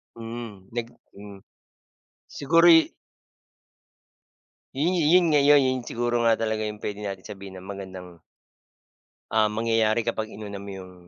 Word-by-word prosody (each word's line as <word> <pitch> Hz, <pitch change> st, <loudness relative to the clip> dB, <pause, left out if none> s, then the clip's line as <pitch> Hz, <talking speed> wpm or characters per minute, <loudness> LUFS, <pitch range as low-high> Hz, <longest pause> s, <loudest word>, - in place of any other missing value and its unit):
Mm. 115 Hz, -4 st, -8 dB
Nag 120 Hz, -1 st, -3 dB, 0.3 s
hmm. 100 Hz, 0 st, -11 dB, 1.0 s
Siguro'y 165 Hz, -, +5 dB, 1.9 s
Yun 175 Hz, +5 st, +2 dB
-yun 175 Hz, +2 st, +4 dB
nga, 150 Hz, -, +4 dB
yo'y 145 Hz, -1 st, +7 dB
yon 130 Hz, 0 st, 0 dB
siguro 120 Hz, 0 st, -1 dB
nga 115 Hz, -1 st, +4 dB
talaga 110 Hz, -1 st, -1 dB
yung 105 Hz, 0 st, -5 dB
puwede 105 Hz, 0 st, -5 dB
nating 100 Hz, -2 st, -6 dB
sabihin 95 Hz, -2 st, -9 dB
na 95 Hz, -, -13 dB
magandang 95 Hz, -3 st, -10 dB, 1.1 s
Um, 110 Hz, 0 st, +3 dB
mangyayari 115 Hz, 0 st, +1 dB
kapag 110 Hz, -1 st, -2 dB
inuna 100 Hz, -2 st, -7 dB
mo 100 Hz, -, -10 dB
'yung, 95 Hz, -1 st, -10 dB
110 Hz, 130 wpm, -25 LUFS, 100-120 Hz, 1.9 s, yo'y